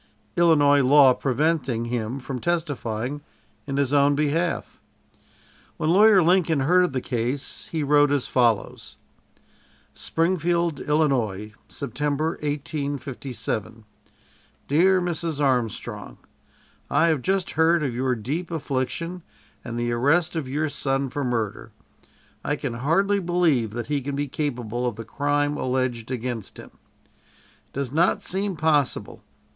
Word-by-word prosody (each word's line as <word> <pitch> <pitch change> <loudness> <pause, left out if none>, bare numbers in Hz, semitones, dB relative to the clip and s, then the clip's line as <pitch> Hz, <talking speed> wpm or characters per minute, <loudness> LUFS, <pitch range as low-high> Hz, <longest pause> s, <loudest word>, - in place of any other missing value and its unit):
Illinois 145 -4 +5
law 135 0 +6
preventing 135 -3 0
him 120 +2 -3
from 130 0 -5
testifying 145 -6 -2 0.5
in 140 -1 -2
his 140 -1 +1
own 145 0 +4
behalf. 155 +4 -1 1.0
When 155 - +1
Lawyer 200 0 +6
Lincoln 165 -4 +3
heard 180 +6 +4
of 175 - -4
the 130 - -1
case, 125 +3 -3
he 160 -2 -2
wrote 145 0 +4
as 145 -3 +1
follows: 115 -5 0 1.0
"SPRINGFIELD, 170 -1 0
ILL., 125 -10 0 0.2
September, 145 +5 -2
1857. 140 -7 -4 0.8
"DEAR 185 +6 +4
MRS. 170 -3 -2
ARMSTRONG: 125 -6 -1 0.7
"I - - +3
have 155 -5 +1
just 190 +6 0
heard 160 0 +3
of 135 -4 -1
your 125 +1 0
deep 145 +11 -4
affliction, 165 +3 -3 0.4
and 120 -1 -5
the 120 0 -1
arrest 150 +9 +2
of 155 -5 -3
your 150 +3 -1
son 135 -2 -2
for 145 - -3
murder. 115 -5 -3 0.7
"I 145 - 0
can 135 -4 -4
hardly 170 +11 +1
believe 170 - +1
that 120 0 -4
he 145 -1 -1
can 140 +1 -4
be 145 +1 -2
capable 125 -4 -3
of 120 - -3
the 115 +1 -8
crime 145 +3 0
alleged 125 -3 -2
against 120 -3 -4
him. - - -11 0.3
"It - - -33
does 135 -2 -3
not 165 +5 +2
seem 195 0 -2
possible. 150 -3 0
145 Hz, 130 wpm, -24 LUFS, 125-160 Hz, 1.0 s, law